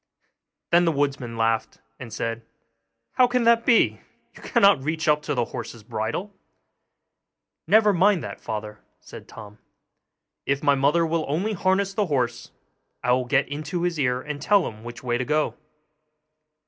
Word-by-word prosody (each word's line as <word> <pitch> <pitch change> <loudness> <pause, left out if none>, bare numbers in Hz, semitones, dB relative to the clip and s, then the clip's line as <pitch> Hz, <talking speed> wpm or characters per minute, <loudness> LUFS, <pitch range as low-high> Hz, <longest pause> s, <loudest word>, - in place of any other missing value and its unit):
Then 175 +1 +5
the 165 - +3
woodman 140 -5 -2
laughed, 115 0 0 0.2
and 120 -3 -9
said, 115 +1 -4 0.7
'How 250 - +4
can 250 0 0
that 235 0 +3
be? 235 - +3 0.3
you - - -14
cannot 200 - +3
reach 160 +3 -2
up 150 0 +3
to 150 -1 -3
the 120 -2 0
horse's 115 -2 -7
bridle.' 115 - -4 1.3
'Never 215 -1 +5
mind 190 -1 +3
that, 100 - -8
father,' 105 -1 -6 0.2
said - - -12
Tom; 105 -1 -12 0.9
'if 140 +1 0
my 145 -1 +4
mother 145 +5 +2
will 165 0 -1
only 180 +10 -1
harness 190 +1 0
the 205 -1 0
horse, 125 -6 -2 0.5
I 125 - +1
will 125 0 +2
get 140 +2 +1
into 150 +5 -4
his 175 -3 -1
ear 125 -2 +1
and 145 +1 -6
tell 200 +5 +3
him 110 0 -10
which 120 +1 -9
way 120 -1 -1
to - - 0
go. 150 +3 0
145 Hz, 160 wpm, -24 LUFS, 120-180 Hz, 1.3 s, Then